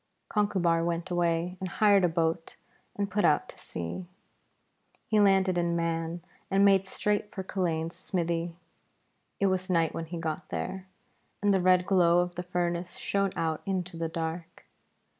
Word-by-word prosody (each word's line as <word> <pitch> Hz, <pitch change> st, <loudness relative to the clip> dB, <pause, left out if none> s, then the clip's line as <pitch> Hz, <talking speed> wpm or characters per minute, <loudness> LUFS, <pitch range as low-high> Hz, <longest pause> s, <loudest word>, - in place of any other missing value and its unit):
Conchubar 180 Hz, -6 st, +2 dB
went 170 Hz, +1 st, -2 dB
away, 175 Hz, +1 st, 0 dB
and 185 Hz, -, -4 dB
hired 200 Hz, 0 st, +4 dB
a 180 Hz, -, +4 dB
boat 165 Hz, 0 st, -1 dB, 0.4 s
and 200 Hz, -1 st, -2 dB
put 205 Hz, +2 st, +1 dB
out 150 Hz, -, +3 dB
to -, -, -12 dB
sea. 85 Hz, -, -6 dB, 1.0 s
He 215 Hz, -, +2 dB
landed 190 Hz, -3 st, +4 dB
in 170 Hz, 0 st, 0 dB
Mann 165 Hz, 0 st, -2 dB, 0.3 s
and 195 Hz, +1 st, +4 dB
made 195 Hz, -1 st, +4 dB
straight 205 Hz, +1 st, -1 dB
for 190 Hz, -, -5 dB
Culain's 170 Hz, -3 st, -2 dB
smithy. 170 Hz, -2 st, -2 dB, 0.8 s
It 200 Hz, -, +2 dB
was 185 Hz, 0 st, 0 dB
night 165 Hz, -3 st, +2 dB
when 165 Hz, -, -4 dB
he 170 Hz, +2 st, -6 dB
got 160 Hz, -2 st, -4 dB
there, 190 Hz, 0 st, -4 dB, 0.6 s
and 205 Hz, -1 st, +4 dB
the 190 Hz, -, +2 dB
red 180 Hz, 0 st, +4 dB
glow 175 Hz, -3 st, +4 dB
of 175 Hz, 0 st, -3 dB
the 175 Hz, -, -4 dB
furnace 175 Hz, 0 st, -2 dB
shone 195 Hz, -1 st, 0 dB
out 160 Hz, -1 st, -1 dB
into 180 Hz, -2 st, -2 dB
the 165 Hz, 0 st, -2 dB
dark. 165 Hz, +1 st, -5 dB
175 Hz, 160 wpm, -29 LUFS, 165-190 Hz, 1.0 s, hired